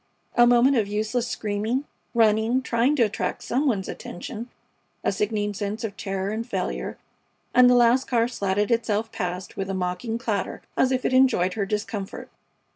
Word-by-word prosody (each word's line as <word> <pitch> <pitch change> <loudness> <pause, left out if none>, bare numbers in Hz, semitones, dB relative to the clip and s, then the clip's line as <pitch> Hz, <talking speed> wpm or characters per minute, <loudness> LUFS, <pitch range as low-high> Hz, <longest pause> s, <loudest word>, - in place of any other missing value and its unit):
A 240 0 +6
moment 245 +3 +5
of 215 -3 +1
useless 220 +4 -1
screaming, 220 +5 -1 0.3
running, 225 +3 +3
trying 245 +4 +2
to 250 - +4
attract 205 -3 -2
some 275 +5 0
one's 200 -7 0
attention, 220 +7 -7 0.5
a - - +2
sickening 210 +1 -1
sense 205 +2 -4
of 210 -3 -4
terror 195 -1 -3
and 220 +2 -2
failure, 245 - -3 0.6
and 250 0 +7
the 250 - +5
last 245 +2 +4
car 235 -2 +2
slatted 205 -2 -1
itself 225 -1 0
past 180 -3 -4
with 195 -1 -3
a 195 - -2
mocking 185 +5 -2
clatter, 220 -5 -3
as 260 - +3
if 255 -1 0
it - - +1
enjoyed 255 -9 +4
her 200 -3 -2
discomfort. 205 -1 -4
220 Hz, 170 wpm, -25 LUFS, 200-240 Hz, 0.6 s, and